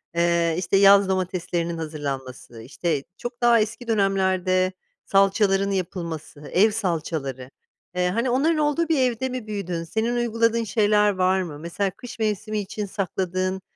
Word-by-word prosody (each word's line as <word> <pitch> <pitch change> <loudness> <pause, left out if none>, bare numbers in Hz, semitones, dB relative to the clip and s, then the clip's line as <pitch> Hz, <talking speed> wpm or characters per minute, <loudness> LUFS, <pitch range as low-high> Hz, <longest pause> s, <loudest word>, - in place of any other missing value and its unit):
Eee, 170 -1 +2
işte, 185 +2 +1
yaz 200 0 +6
domateslerinin 175 -2 -2
hazırlanması, 135 -7 -6
işte, 150 +3 -2
çok 240 0 -7
daha 235 -1 +5
eski 225 +3 -3
dönemlerde 190 -3 +1 0.3
salçaların 195 0 +3
yapılması, 170 -5 -4
ev 210 +5 +5
salçaları. 160 - -3 0.5
Eee, 180 0 +1
hani, 230 +7 0
onların 295 +6 +2
olduğu 305 +2 +1
bir 315 -4 +2
evde 255 0 0
mi 250 -4 -5
büyüdün? 180 -5 -3
Senin 220 +7 -1
uyguladığın 230 -1 +1
şeyler 210 0 +3
var 185 0 +2
mı? 155 -5 -6
Mesela 180 +4 -2
kış 245 -2 -10
mevsimi 215 0 -1
için 205 +1 -4
sakladığın, 185 0 -2
195 Hz, 140 wpm, -24 LUFS, 170-220 Hz, 0.5 s, yaz